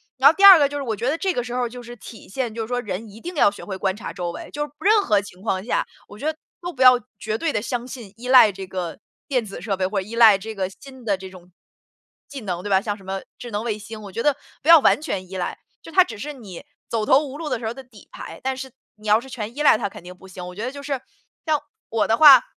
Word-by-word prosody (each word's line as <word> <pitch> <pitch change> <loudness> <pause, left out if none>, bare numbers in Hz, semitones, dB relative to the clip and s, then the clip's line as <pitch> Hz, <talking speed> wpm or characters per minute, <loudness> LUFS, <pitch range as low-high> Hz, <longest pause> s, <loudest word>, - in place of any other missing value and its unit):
然 265 +2 +7
后 - - +3
第 395 +3 +4
2 390 -3 +12
个 285 -2 +3
就 290 - -4
是 285 - -3
我 225 -4 -2
觉 235 +5 -1
得 310 - 0
这 380 +1 0
个 245 - -1
时 245 0 -6
候 250 0 0
儿 - - -4
就 245 +1 -10
是 240 +1 -9
体 220 +1 -12
现 240 +1 -3
就 230 - -3
是 220 - -4
说 245 0 0
人 210 -1 -5
一 210 +2 -13
定 350 +7 -7
要 205 - +4
学 200 - -11
会 190 -2 -5
观 190 0 0
察 215 -6 -7
周 175 -1 -4
围， - - -9
就 295 - -2
是 295 - -15
任 425 +2 +4
何 210 -2 +3
情 185 -2 -13
况 190 -3 -1
下， - - 0 0.2
我 205 - -13
觉 285 - -7
得 315 - -17 0.2
都 350 0 -4
不 265 - -8
要 255 -1 +8 0.2
绝 215 0 -2
对 320 +6 -1
地 210 - -1
相 240 +2 -3
信、 235 -6 -10
依 245 +2 -8
赖 255 -5 +8
这 195 -1 -7
个 180 -3 -5 0.3
电 255 -5 +1
子 195 - -8
设 200 -3 -1
备， 185 0 -1
或 195 +1 -1
者 190 - -10
依 230 - -7
赖 225 -4 +7
这 220 +3 -8
个 190 -2 -2
新 260 +5 -14
的 200 -4 0
这 190 0 -9
种 180 -1 -15 0.8
技 275 -2 -7
能 180 -4 -4
对 205 - -5
吧， 190 -1 +4
像 205 +1 -3
什 200 - -16
么 190 0 -4 0.2
智 240 - -9
能 205 +1 -2
卫 215 -3 -1
星， 220 0 -9
我 200 - -9
觉 230 - -3
得 295 -2 +2 0.2
不 300 - -2
要 335 -1 +10
完 285 - +3
全 185 - -4
依 190 - -8
赖， 180 - -3 0.2
就 - - -12
它 370 +2 +6
只 225 - -9
是 295 +9 -5
你 210 -8 -10 0.2
走 225 -2 -1
投 265 - +6
无 280 0 -8
路 315 -1 -5
的 255 -3 -1
时 230 - -7
候 220 - -1
儿 - - -6
的 265 +2 -10
底 230 -5 -18
牌。 - - -9
但 265 0 -1
是 265 0 -7 0.2
你 215 0 -12
要 210 +1 +5
是 255 - -12
全 230 -2 -6
依 - - -2
赖 290 - +6
它 210 -3 -2
肯 - - -12
定 180 +1 -10
不 190 +1 -16
行， 185 -1 -9
我 180 - -9
觉 210 - -5
得 255 - -2
就 280 +1 -9
是， 280 -3 -3 0.4
像 310 -2 +2 0.3
我 220 -2 +1
的 225 - +3
话， 275 -4 +10
225 Hz, 330 characters per minute, -22 LUFS, 195-265 Hz, 0.8 s, 2